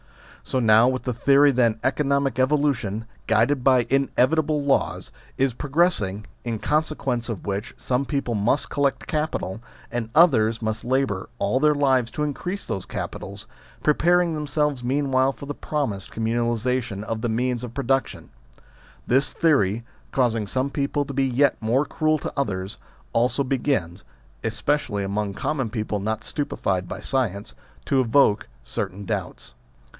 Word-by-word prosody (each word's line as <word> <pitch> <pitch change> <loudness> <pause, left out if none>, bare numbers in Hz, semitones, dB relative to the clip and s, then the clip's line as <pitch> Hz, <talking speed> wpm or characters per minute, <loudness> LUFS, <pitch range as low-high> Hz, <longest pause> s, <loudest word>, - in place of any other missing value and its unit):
So 130 - -1
now 110 0 +6
with 130 0 -1
the 125 - -1
theory 140 +4 +5
that 120 -3 +3
an 110 - -22
economic 140 -1 +1
evolution, 130 -6 +1 0.2
guided 120 +4 +2
by 130 -3 +4
inevitable 145 +3 +2
laws, 140 -1 0 0.3
is 135 -2 +2
progress 155 +5 +2
ing, 100 +2 -4 0.2
in 115 -2 -2
consequence 140 -4 -1
of 110 -5 -5
which 100 +3 -3
some 130 +2 -1
people 140 -4 -2
must 110 +7 +1
collect 140 -2 0
capital, 150 - -2 0.3
and 120 -2 -3
others 115 -9 +5
must 110 0 -2
labour 125 -6 0
all 105 +6 +1
their 150 +1 +4
lives 130 -4 +2
to 150 - -1
increase 175 +7 -3
those 95 - -4
capitals, 100 0 -6 0.4
preparing 170 +3 +3
them 150 -1 -3
selves 145 -3 0
meanwhile 135 0 +2
for 140 - -10
the 145 - -4
promised 135 -11 -3
communalisa 120 +2 0
tion 105 -4 -6
of 110 0 -4
the 120 - -1
means 125 +1 -1
of 120 -1 -7
production; 135 0 -1 0.7
this 135 +3 +2
theory, 120 - +2 0.3
causing 115 -5 +1
some 130 +6 -1
people 145 0 -1
to 140 - -6
be 135 0 +1
yet 135 +2 +2
more 120 +6 +2
cruel 155 0 +1
to - - -5
others, 100 -8 -2 0.3
also 125 +4 +2
begins 125 - -1 0.4
(especially 110 -2 -1
among 100 0 -2
common 135 +1 -1
people 105 -2 -2
not 110 +2 -2
stupefied 95 - -2
by - - -5
science) 105 -7 -2 0.3
to 135 - +3
evoke 115 -3 +3 0.2
certain 95 +11 -4
doubts. - - -4
125 Hz, 150 wpm, -24 LUFS, 110-140 Hz, 0.7 s, now